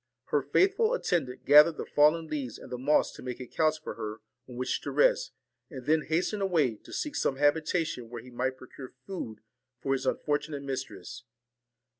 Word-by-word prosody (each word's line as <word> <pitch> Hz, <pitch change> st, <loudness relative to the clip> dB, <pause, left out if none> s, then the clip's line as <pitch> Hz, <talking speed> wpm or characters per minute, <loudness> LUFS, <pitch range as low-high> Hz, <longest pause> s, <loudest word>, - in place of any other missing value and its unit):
Her -, -, +2 dB
faithful 440 Hz, +5 st, +3 dB
attendant 155 Hz, -, -2 dB
gathered 150 Hz, +3 st, +7 dB
the -, -, -4 dB
fallen 155 Hz, +3 st, +3 dB
leaves 140 Hz, -7 st, -4 dB
and -, -, -12 dB
the 125 Hz, -, -4 dB
moss 145 Hz, +4 st, +3 dB
to -, -, -11 dB
make 125 Hz, -1 st, -5 dB
a 125 Hz, -, -6 dB
couch 155 Hz, +4 st, +1 dB
for -, -, -6 dB
her 110 Hz, 0 st, -6 dB, 0.3 s
on 125 Hz, -, -9 dB
which 125 Hz, +1 st, -2 dB
to -, -, -5 dB
rest, -, -, +3 dB, 0.4 s
and 130 Hz, -7 st, -9 dB
then 155 Hz, +2 st, +3 dB
hastened 180 Hz, +6 st, 0 dB
away, 155 Hz, -, +1 dB
to -, -, -16 dB
seek 295 Hz, -1 st, -3 dB
some 135 Hz, -, +1 dB
habitation 150 Hz, -2 st, 0 dB
where 120 Hz, -1 st, -7 dB
he 125 Hz, -, -13 dB
might 130 Hz, +2 st, -2 dB
procure 130 Hz, 0 st, -11 dB
food 145 Hz, -, -6 dB, 0.4 s
for 135 Hz, -, 0 dB
his 135 Hz, -1 st, -2 dB
unfortunate 145 Hz, -1 st, -1 dB
mistress. 125 Hz, -5 st, -6 dB
145 Hz, 185 wpm, -29 LUFS, 125-160 Hz, 0.4 s, gathered